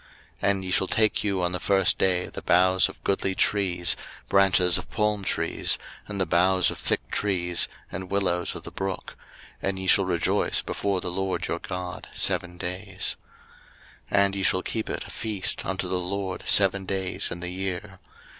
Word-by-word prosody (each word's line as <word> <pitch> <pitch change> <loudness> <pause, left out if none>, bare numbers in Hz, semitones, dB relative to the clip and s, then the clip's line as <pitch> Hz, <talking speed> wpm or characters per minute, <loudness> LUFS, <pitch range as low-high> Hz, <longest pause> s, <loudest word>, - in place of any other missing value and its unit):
03:023:040 100 - +3
And 95 -1 -3
ye 90 - -4
shall 95 - +2
take 110 +1 +2
you 100 -3 0
on 90 - +1
the 90 - -2
first 95 -2 +3
day 90 -1 +2
the - - -8
boughs 95 +1 +4
of - - -13
goodly 95 -1 0
trees, 90 -5 +2 0.3
branches 95 -2 +4
of - - -10
palm 105 -1 0
trees, - - +1 0.3
and 100 -1 -5
the 95 - +2
boughs 90 +1 +3
of - - -8
thick - - -1
trees, 90 -4 +1 0.2
and 90 +1 -6
willows 90 -3 0
of - - -7
the - - -8
brook; 95 -1 -4 0.5
and 95 0 -1
ye 95 - -4
shall 95 +1 +5
rejoice 85 -2 +1
before 100 -2 -1
the 90 - -1
LORD 95 +1 -2
your - - -2
God 90 -2 -6
seven 90 0 +1
days. 90 +2 -2 1.0
03:023:041 - - +2
And 100 0 -2
ye - - -2
shall 95 0 +2
keep 110 -1 -3
it - - -3
a - - -8
feast 105 -4 -3
unto 95 -1 -1
the 90 0 0
LORD 95 +1 -3
seven 100 -1 +3
days 95 -1 -2
in 85 - -5
the 90 0 -4
year. 95 +1 -5
95 Hz, 185 wpm, -26 LUFS, 90-100 Hz, 1.0 s, shall